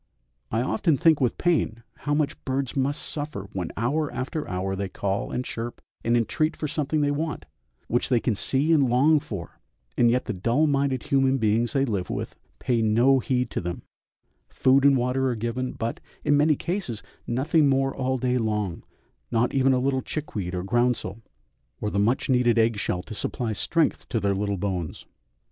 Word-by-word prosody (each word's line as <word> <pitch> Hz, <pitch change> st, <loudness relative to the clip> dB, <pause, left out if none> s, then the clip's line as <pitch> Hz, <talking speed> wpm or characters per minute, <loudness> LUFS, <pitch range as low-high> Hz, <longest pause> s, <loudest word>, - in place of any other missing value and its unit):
I 115 Hz, -, 0 dB
often 160 Hz, +1 st, +1 dB
think 160 Hz, +1 st, +4 dB
with 125 Hz, -, +1 dB
pain 155 Hz, -10 st, 0 dB
how 145 Hz, +1 st, -1 dB
much 150 Hz, -1 st, -1 dB
birds 135 Hz, -1 st, -2 dB
must 140 Hz, +1 st, 0 dB
suffer 145 Hz, -10 st, -5 dB
when 90 Hz, -4 st, -3 dB
hour 145 Hz, +7 st, 0 dB
after 140 Hz, +4 st, -4 dB
hour 95 Hz, +1 st, -2 dB
they 100 Hz, 0 st, -3 dB
call 100 Hz, +1 st, -2 dB
and 125 Hz, -, -3 dB
chirp 115 Hz, +1 st, -5 dB, 0.2 s
and 120 Hz, +1 st, +3 dB
entreat 155 Hz, +7 st, 0 dB
for 155 Hz, -, -2 dB
something 150 Hz, +1 st, -1 dB
they 145 Hz, 0 st, +2 dB
want, 155 Hz, +2 st, -3 dB, 0.4 s
which 120 Hz, -, 0 dB
they 125 Hz, -3 st, +4 dB
can 115 Hz, -, 0 dB
see 135 Hz, +9 st, +1 dB
and 140 Hz, -5 st, +4 dB
long 145 Hz, +6 st, +4 dB
for, 105 Hz, -, -8 dB, 0.4 s
and 120 Hz, -, +4 dB
yet 125 Hz, +2 st, +1 dB
the -, -, -2 dB
dull 115 Hz, -, +2 dB
minded 140 Hz, -3 st, +1 dB
human 135 Hz, -1 st, +2 dB
beings 115 Hz, 0 st, +1 dB
they 135 Hz, -1 st, +2 dB
live 100 Hz, -7 st, -2 dB
with -, -, -4 dB, 0.2 s
pay 120 Hz, -2 st, 0 dB
no 120 Hz, +5 st, +4 dB
heed 125 Hz, -1 st, -1 dB
to -, -, -2 dB
them, 85 Hz, 0 st, -5 dB, 0.7 s
food 135 Hz, +1 st, +3 dB
and 140 Hz, -1 st, +6 dB
water 130 Hz, +2 st, +1 dB
are 125 Hz, -, -1 dB
given, 120 Hz, +3 st, -3 dB
but, 115 Hz, +1 st, -3 dB, 0.3 s
in 145 Hz, -, +4 dB
many 150 Hz, +1 st, +4 dB
cases, 170 Hz, -, -3 dB, 0.2 s
nothing 145 Hz, +5 st, +2 dB
more 135 Hz, 0 st, +2 dB
all 130 Hz, 0 st, 0 dB
day 125 Hz, 0 st, +1 dB
long, 105 Hz, -6 st, -1 dB, 0.5 s
not 120 Hz, +1 st, +1 dB
even 135 Hz, 0 st, +3 dB
a 130 Hz, -, +3 dB
little 130 Hz, 0 st, +1 dB
chickweed 105 Hz, -, -4 dB
or 90 Hz, -, -2 dB
groundsel, 120 Hz, -1 st, 0 dB, 0.6 s
or 105 Hz, -, -2 dB
the 100 Hz, -, 0 dB
much 115 Hz, +6 st, +1 dB
needed 125 Hz, -2 st, +3 dB
egg 115 Hz, -2 st, +3 dB
shell 90 Hz, -2 st, -1 dB
to 110 Hz, -, -8 dB
supply 115 Hz, +1 st, -2 dB
strength 160 Hz, +8 st, 0 dB
to 115 Hz, -, 0 dB
their 100 Hz, -1 st, +1 dB
little 100 Hz, 0 st, -1 dB
bones. 90 Hz, -4 st, -3 dB
125 Hz, 190 wpm, -25 LUFS, 110-140 Hz, 0.7 s, and